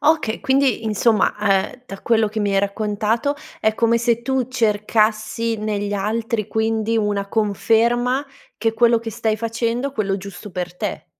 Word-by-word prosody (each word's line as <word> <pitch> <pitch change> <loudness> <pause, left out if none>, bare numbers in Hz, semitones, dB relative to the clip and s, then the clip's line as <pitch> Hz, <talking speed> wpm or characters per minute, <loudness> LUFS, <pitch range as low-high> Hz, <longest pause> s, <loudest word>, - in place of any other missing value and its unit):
Okay, 310 -8 +2
quindi 265 -4 +2
insomma, 220 +1 +2
ehm, 205 +4 0
da 195 -3 -8
quello 225 -2 +2
che 215 +1 -3
mi 205 -1 0
hai 195 - +3
raccontato, 215 +6 0 0.3
è 220 0 +2
come 230 +1 +2
se 235 0 +1
tu 260 -1 0
cercassi 220 -1 +1
negli 205 -1 -2
altri 215 +1 -1
quindi 220 0 0
una 205 -2 0
conferma 235 +5 +1 0.3
che 225 +1 0
quello 235 0 +4
che 225 0 -6
stai 220 -1 -1
facendo, 235 +4 -2
quello 200 -5 -1
giusto 200 +1 -9
per 180 0 -5
te. - - -4
220 Hz, 155 wpm, -21 LUFS, 210-235 Hz, 0.3 s, quello